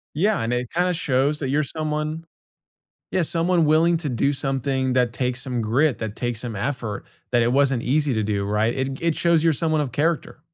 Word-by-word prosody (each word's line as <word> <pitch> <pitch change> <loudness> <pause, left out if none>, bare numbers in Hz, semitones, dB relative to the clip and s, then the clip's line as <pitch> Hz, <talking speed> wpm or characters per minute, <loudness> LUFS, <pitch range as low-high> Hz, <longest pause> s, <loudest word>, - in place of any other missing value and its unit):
Yeah, 205 +7 +2
and 115 +1 -1
it 125 0 -2
kinda 180 +2 +1
shows 145 -2 +1
that 135 - -2
you're 145 +3 +2
someone 155 +2 -3 0.9
Yeah, 185 - +1
someone 170 +1 +1
willing 165 +3 +3
to 160 -3 -3
do 130 +3 +1
something 135 -1 -1
that 125 -2 +1
takes 125 -1 -1
some 125 -3 -2
grit, 125 +4 +1
that 110 -2 -4
takes 120 -2 -2
some 120 -3 -5
effort, 110 -2 -3 0.3
that 120 -1 +3
it 115 +1 +2
wasn't 135 -3 +2
easy 145 +1 +1
to 110 - 0
do, 100 -1 -1
right? 105 +3 +1
It 135 0 -2
g 140 - -10
it 165 -2 +2
shows 170 -2 +2
you're 165 - +4
someone 155 +1 0
of 140 -4 -3
character. 155 +6 -1
135 Hz, 210 wpm, -23 LUFS, 120-155 Hz, 0.9 s, you're